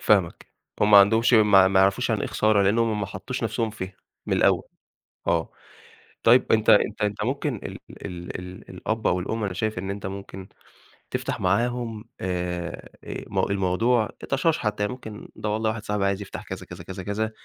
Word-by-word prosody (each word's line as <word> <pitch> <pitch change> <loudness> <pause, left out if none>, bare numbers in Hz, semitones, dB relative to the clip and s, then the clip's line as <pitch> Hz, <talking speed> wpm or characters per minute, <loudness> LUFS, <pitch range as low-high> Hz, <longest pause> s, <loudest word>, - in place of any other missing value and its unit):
فاهمك. 95 -5 +2 0.3
هم 105 - +4
ما 100 - +10
عندهمش 115 +5 +5
ما 100 -3 +6
ما 95 0 +4
يعرفوش 95 0 +2
يعني - - +1
إيه - - -1
خسارة، 110 -2 +3
لإن 100 +4 +3
هم 115 -2 +1
ما 100 - -2
حطّوش 100 +7 -5
نَفْسهم 110 0 -1
فيها 95 -3 -7 0.3
من - - +1
الأول، - - +3 0.6
آه. 85 -1 +1 0.7
طيب 120 +3 +5
أنت 110 -1 +4
أنت 105 +1 +4
أنت 105 0 -1
ممكن 135 0 -1
ال - - -7
ال 90 -1 -7
ال 90 +1 -10
الأب 110 +5 -3
أو 90 0 +2
الأم، 110 +4 -2
أنا 95 - -3
شايف 110 +1 -2
إن 95 +1 -4
أنت 100 -1 -5
ممكن 95 -1 -7 0.6
تفتح - - -2
معاهم 115 +3 0 0.2
آآ 90 -1 -3
آآ - - -6
م - - -2
الموضوع 100 +4 +2 0.2
طَشاش 155 +4 +2
حتّى، 105 -1 -1
يعني 105 - -1
ممكن 110 -4 -9
ده 105 - -3
والله 110 +1 0
واحد 110 -1 -4
صاحبي 105 -2 -1
عايز 100 +1 0
يفتح 100 - -7
كذا، - - -7
كذا، - - -10
كذا، 95 0 -7
كذا 110 +3 -2
105 Hz, 190 wpm, -25 LUFS, 95-110 Hz, 0.7 s, ما